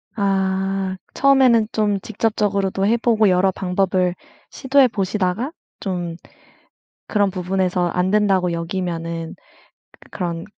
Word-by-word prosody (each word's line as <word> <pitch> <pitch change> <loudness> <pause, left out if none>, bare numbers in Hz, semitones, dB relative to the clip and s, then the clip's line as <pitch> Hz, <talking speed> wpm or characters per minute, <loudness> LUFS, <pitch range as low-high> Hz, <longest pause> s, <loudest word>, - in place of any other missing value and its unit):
아. 195 -1 0 0.2
처음에는 260 -5 +4
좀 205 -2 0
직접적으로도 200 -3 -1
해 225 +3 +3
보고 225 -3 +3
여러 185 +1 +3
방법을 185 -1 0 0.3
시도해 265 -1 +3
보시다가 200 +4 -1 0.3
좀 175 -4 -3 0.9
그런 205 -2 +2
부분에서 185 -1 -1
안 180 +2 0
된다고 195 -4 +2
여기면은 170 -1 -4 0.7
그 - - -19
그런 170 -2 -4
190 Hz, 255 characters per minute, -20 LUFS, 180-210 Hz, 0.9 s, 처음에는